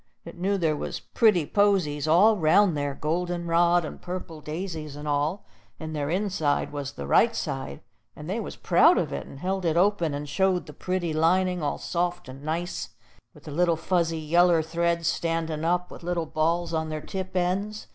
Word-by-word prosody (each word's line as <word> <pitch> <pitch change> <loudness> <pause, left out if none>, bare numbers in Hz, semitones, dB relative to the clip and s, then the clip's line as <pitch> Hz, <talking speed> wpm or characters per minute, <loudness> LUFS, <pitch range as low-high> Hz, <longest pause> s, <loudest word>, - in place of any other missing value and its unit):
It 170 - -9
knew 195 +3 0
there 160 -4 +1
was - - -4
pretty 210 -9 +2
posies 175 -7 +1
all 195 +8 +6
'round 175 +1 +4
there, 145 -1 -2
golden 175 +3 -2
rod 170 0 +3
and - - -8
purple 175 -3 -6
daisies 155 -1 -5
and 150 +1 -7
all; 150 +6 -1 0.3
and 155 -1 -6
their 145 -1 -2
inside 180 -5 0
was 145 -1 -4
the - - -7
right 230 0 +4
side, 135 -9 -4 0.3
and 150 - -9
they 195 +6 -2
was 215 - -6
proud - - +4
of - - -1
it, 70 - -5
and - - -11
held 190 +1 -1
it 165 -1 +1
open, 175 -5 +2
and 145 +1 -5
showed 185 +4 +1
the - - -11
pretty 180 -3 -2
lining, 180 +3 +2
all 145 - -1
soft 175 -2 -2
and 130 +1 -10
nice 165 +4 -4 0.4
with - - -16
the 150 - -8
little 170 +2 +2
fuzzy 165 -1 0
yeller 165 +1 +3
threads 170 +1 0
standin' 165 -1 -1
up, 180 +2 0
with - - -10
little 175 -1 -2
balls 165 +2 0
on 160 -1 -1
their 155 -1 -4
tip 185 +3 -6
ends. 195 +4 -1
170 Hz, 190 wpm, -26 LUFS, 155-180 Hz, 0.4 s, all